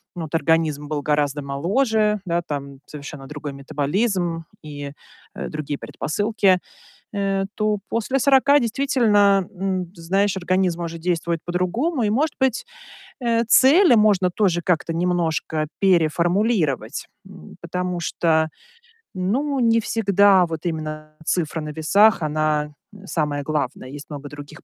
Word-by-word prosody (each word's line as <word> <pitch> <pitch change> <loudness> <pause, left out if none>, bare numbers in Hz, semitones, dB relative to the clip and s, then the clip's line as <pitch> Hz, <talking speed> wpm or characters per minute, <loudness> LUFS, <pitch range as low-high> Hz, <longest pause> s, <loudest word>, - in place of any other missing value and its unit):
вот 160 -3 -6
организм 160 -3 +1
был 145 -1 -3
гораздо 145 -1 0
моложе, 210 - +1
да, 170 -1 0
там 140 -4 -6
совершенно 145 -2 -9
другой 145 0 -6
метаболизм 165 - -1 0.2
и, 145 -2 -7 0.4
э, - - -5
другие 150 -1 -4
предпосылки, 200 +5 0 0.6
э, 195 -1 0
то 215 -1 0
после 235 +4 0
40 280 +2 +5
действительно, 215 -7 +2
м, 185 -2 -2
ты 170 0 -16
знаешь, 195 +3 +1
организм 185 -1 0
может 170 0 -5
действовать 170 -1 -1
по-другому. 225 - -1
И 210 - +1
может 285 +7 0
быть, 265 - +1 0.6
э, 235 -1 +1
цели 270 - +6
можно 205 -4 +4
тоже 175 -3 +1
как-то 170 -1 0
немножко 165 -3 -1
переформулировать, 175 - +1 0.2
м. 75 - -13
Потому 180 +1 -3
что, 160 -2 +1 0.6
ну, 260 +10 -1
не 230 -2 +3
всегда 200 -4 +4
вот 165 0 -6
именно 155 -2 -5
цифра 160 -2 -1
на 150 - -6
весах, 185 +8 +3
она, 150 -1 0 0.2
э, 200 -1 -13
самая 150 -4 -1
главная. 140 -3 -3
Есть 145 +2 -9
много 145 -1 -7
других 145 0 -11
175 Hz, 130 wpm, -22 LUFS, 155-205 Hz, 0.6 s, цели